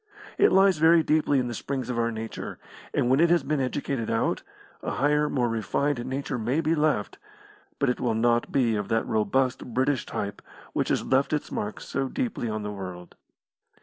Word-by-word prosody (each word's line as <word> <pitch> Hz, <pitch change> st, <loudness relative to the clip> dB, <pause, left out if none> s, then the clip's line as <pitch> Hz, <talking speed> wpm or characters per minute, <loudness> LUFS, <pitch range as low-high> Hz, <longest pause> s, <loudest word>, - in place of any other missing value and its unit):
It -, -, +6 dB
lies 190 Hz, -3 st, +5 dB
very 165 Hz, +1 st, +6 dB
deeply 150 Hz, -2 st, +2 dB
in 125 Hz, -2 st, +1 dB
the 120 Hz, -, -4 dB
springs 130 Hz, +3 st, -4 dB
of 120 Hz, -, -2 dB
our 115 Hz, 0 st, +1 dB
nature, 110 Hz, 0 st, -6 dB, 0.3 s
and -, -, +1 dB
when 130 Hz, +3 st, +3 dB
it 170 Hz, +1 st, +5 dB
has 170 Hz, -4 st, +3 dB
been 150 Hz, +1 st, 0 dB
educated 130 Hz, -2 st, -2 dB
out, 115 Hz, -, 0 dB, 0.4 s
a -, -, -3 dB
higher, 150 Hz, +2 st, +2 dB
more 125 Hz, -3 st, +1 dB
refined 120 Hz, +4 st, -1 dB
nature 135 Hz, -1 st, -3 dB
may 120 Hz, +7 st, 0 dB
be 160 Hz, 0 st, +1 dB
left, 155 Hz, -1 st, 0 dB, 0.6 s
but 140 Hz, -, +1 dB
it 125 Hz, -, 0 dB
will 115 Hz, -3 st, 0 dB
not 120 Hz, +1 st, +2 dB
be 120 Hz, -5 st, +2 dB
of 105 Hz, -1 st, -2 dB
that 115 Hz, 0 st, +1 dB
robust 130 Hz, +4 st, +1 dB
British 130 Hz, 0 st, +1 dB
type 100 Hz, 0 st, -4 dB, 0.3 s
which -, -, 0 dB
has -, -, 0 dB
left 135 Hz, +3 st, +2 dB
its 150 Hz, -, -2 dB
mark 105 Hz, +1 st, -3 dB
so 135 Hz, -1 st, -3 dB
deeply 230 Hz, -, -2 dB
on 110 Hz, -1 st, -3 dB
the 105 Hz, -, -4 dB
world. 90 Hz, -3 st, -8 dB
130 Hz, 195 wpm, -26 LUFS, 115-145 Hz, 0.6 s, It